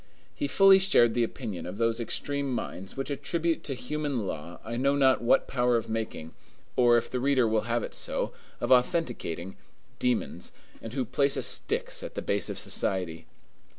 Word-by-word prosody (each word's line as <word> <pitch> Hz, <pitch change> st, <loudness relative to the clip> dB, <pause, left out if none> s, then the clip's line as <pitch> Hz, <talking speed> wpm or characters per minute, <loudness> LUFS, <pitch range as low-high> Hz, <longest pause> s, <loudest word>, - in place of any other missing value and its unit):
He 290 Hz, -, -2 dB
fully 195 Hz, -4 st, +7 dB
shared 120 Hz, -12 st, +4 dB
the 120 Hz, -, +2 dB
opinion 110 Hz, -7 st, -5 dB
of 90 Hz, +3 st, -7 dB
those 115 Hz, 0 st, +1 dB
extreme 140 Hz, +4 st, -2 dB
minds 95 Hz, -5 st, -5 dB
which 135 Hz, +2 st, -3 dB
attribute 165 Hz, +3 st, -1 dB
to 135 Hz, -, -3 dB
human 140 Hz, -3 st, -3 dB
law 85 Hz, -1 st, -6 dB
I 115 Hz, +1 st, -4 dB
know 140 Hz, +3 st, +2 dB
not 135 Hz, -2 st, +4 dB
what 120 Hz, -, +3 dB
power 125 Hz, -2 st, +2 dB
of 115 Hz, -1 st, -4 dB
making, 110 Hz, -8 st, -4 dB, 0.4 s
or, 120 Hz, -1 st, +5 dB
if 120 Hz, -, -1 dB
the 125 Hz, -, -3 dB
reader 130 Hz, -2 st, +3 dB
will 110 Hz, +1 st, 0 dB
have 120 Hz, 0 st, +1 dB
it -, -, -6 dB
so, -, -, -2 dB, 0.3 s
of 120 Hz, -, -2 dB
authenticating, 125 Hz, -, +1 dB, 0.4 s
demons, 125 Hz, -2 st, -1 dB, 0.3 s
and 115 Hz, -, -8 dB
who 130 Hz, -1 st, -1 dB
place 140 Hz, +4 st, +1 dB
a -, -, -1 dB
Styx -, -, 0 dB
at -, -, -8 dB
the -, -, -4 dB
base 100 Hz, -2 st, 0 dB
of -, -, -4 dB
society. 85 Hz, -4 st, -1 dB
120 Hz, 185 wpm, -28 LUFS, 110-140 Hz, 0.4 s, fully